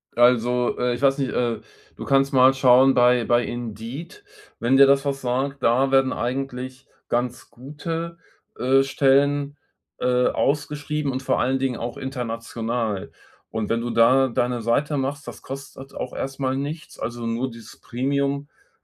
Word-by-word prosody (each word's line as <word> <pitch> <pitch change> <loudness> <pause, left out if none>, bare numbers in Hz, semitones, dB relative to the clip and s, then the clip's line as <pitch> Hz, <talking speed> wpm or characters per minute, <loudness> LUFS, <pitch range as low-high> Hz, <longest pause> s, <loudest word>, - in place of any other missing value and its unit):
Also, 120 0 +3
äh, 125 0 0
ich 120 - -8
weiß 135 0 +3
nicht, 135 -3 -1
äh, 120 -3 -1 0.4
du - - -8
kannst 135 0 +2
mal 130 0 +6
schauen 135 0 +5
bei 125 -1 +4
bei 120 0 +3
Indeed, 120 - -7 0.4
wenn 125 +3 +3
dir 140 - +9
das 140 +1 +3
was 140 -1 -2
sagt. 135 +2 -2
Da 130 +4 +3
werden 135 -1 +3
eigentlich 130 +1 -4 0.2
ganz 120 0 -2
gute, 165 +6 -6 0.4
äh, 135 +2 +3
Stellen, 140 +1 +2 0.4
äh, 125 0 +2
ausgeschrieben 145 0 -1
und 130 +1 -4
vor - - +1
allen 130 +2 +1
Dingen 130 -2 -1
auch 120 0 -5
international. 115 -4 -4 0.4
Und 110 -1 -3
wenn 115 0 0
du 120 - -3
da 125 +4 +5
deine 120 0 -1
Seite 140 +6 0
machst, 140 +1 -3
das - - -9
kostet 135 0 -9
auch 125 - -5
erstmal 135 -1 -3
nichts. 150 +4 -6
Also, 120 0 -4
nur 115 +3 -1
dieses 115 -2 -13
Premium-Angebot 140 +3 -3
130 Hz, 155 wpm, -23 LUFS, 120-140 Hz, 0.4 s, dir